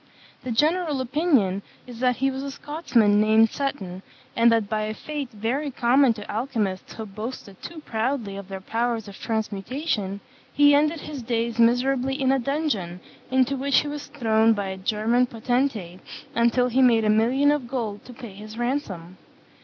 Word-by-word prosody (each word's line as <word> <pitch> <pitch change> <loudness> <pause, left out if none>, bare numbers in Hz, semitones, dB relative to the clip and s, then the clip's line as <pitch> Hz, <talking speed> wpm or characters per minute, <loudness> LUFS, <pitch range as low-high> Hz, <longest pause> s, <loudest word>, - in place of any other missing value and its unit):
The 255 - -6
general 305 +4 +1
opinion 255 - +1 0.2
is 245 -2 -10
that 250 0 +2
he 270 +2 0
was 265 0 -5
a 280 - -4
Scotsman 245 -9 +1
named 220 +1 +4
Seton, 190 -10 -4 0.3
and 235 0 +5
that 225 -3 +2
by 215 0 -1
a 215 0 -4
fate 295 -1 -5
very 240 +8 -2
common 255 +1 +3
to 210 -2 -9
alchymists 215 -5 -2
who 220 - -6
boasted 210 -1 -8
too 325 -3 -9
loudly 225 -2 -1
of 200 -1 -8
their 195 -1 -7
powers 230 +1 -2
of 200 - -11
transmutation, 215 - -2 0.3
he 290 +1 +5
ended 300 +2 +2
his 290 -4 -7
days 235 0 -2
miserably 255 +3 +2
in 265 -1 +2
a 270 - +2
dungeon, 240 - -2 0.3
into 260 +1 +2
which 275 0 +2
he 295 - -6
was 290 0 -6
thrown 225 -5 +3
by 200 -2 -3
a 190 - -5
German 225 +5 +1
potentate 230 -6 -1 0.3
until 235 +2 +3
he 255 +2 +2
made 230 -3 +5
a - - +2
million 250 +7 +3
of 290 -5 -1
gold 225 -5 -4
to - - -10
pay 235 -5 -10
his 215 +2 -10
ransom. 205 - -3
235 Hz, 175 wpm, -24 LUFS, 215-270 Hz, 0.3 s, and